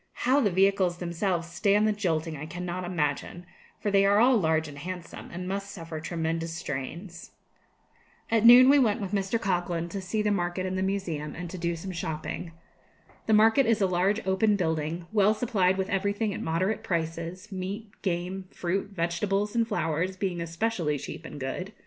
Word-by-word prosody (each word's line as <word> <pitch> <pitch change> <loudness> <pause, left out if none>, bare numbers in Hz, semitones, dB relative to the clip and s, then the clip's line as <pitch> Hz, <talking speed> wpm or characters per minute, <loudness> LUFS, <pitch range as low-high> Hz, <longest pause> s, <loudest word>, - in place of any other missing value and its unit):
How 260 +3 +5
the 225 -7 +3
vehicles 190 -1 +2
themselves 170 0 -1
stand 205 +4 +2
the - - +3
jolting 165 -6 -1
I 150 +1 -6
cannot 180 +1 -4
imagine, 175 0 -2 0.3
for 205 - -1
they 195 0 +5
are 200 +1 +4
all 245 +4 +6
large 160 -6 +2
and 145 -1 -9
handsome, 180 +1 -7
and 180 +1 -5
must 200 +1 -3
suffer 165 -5 -7
tremendous 165 0 -2
strains. 170 +4 -6 1.0
At 225 -1 +3
noon 245 +2 +10
we 285 +1 +7
went 230 -3 +2
with 195 -3 -4
Mr. 200 +2 0
Coghlan 175 -4 -1
to 195 +3 -4
see 210 +3 -1
the 210 - +2
market 180 -1 -1
and 185 0 -2
the 190 - -1
museum, 180 -6 -2
and 175 0 -6
to 185 - -6
do 170 0 -1
some 185 +3 -6
shopping. 165 0 -4 0.8
The 220 - +3
market 225 +5 +5
is 230 -1 +3
a 195 - +3
large 190 +4 +1
open 190 +3 +3
building, 160 -2 -1
well 210 0 +4
supplied 195 -6 +1
with 190 0 -1
everything 205 +2 0
at - - -5
moderate 185 +6 0
prices; 170 +4 -3
meat, 200 +3 -5
game, 185 +1 -2
fruit, 190 +3 -2
vegetables, 195 +3 -1
and 230 -1 +2
flowers 185 -3 -1
being 185 -3 -2
especially 170 -2 -1
cheap 160 - -8
and 145 - -8
good. 180 +10 -4
185 Hz, 180 wpm, -28 LUFS, 170-205 Hz, 1.0 s, noon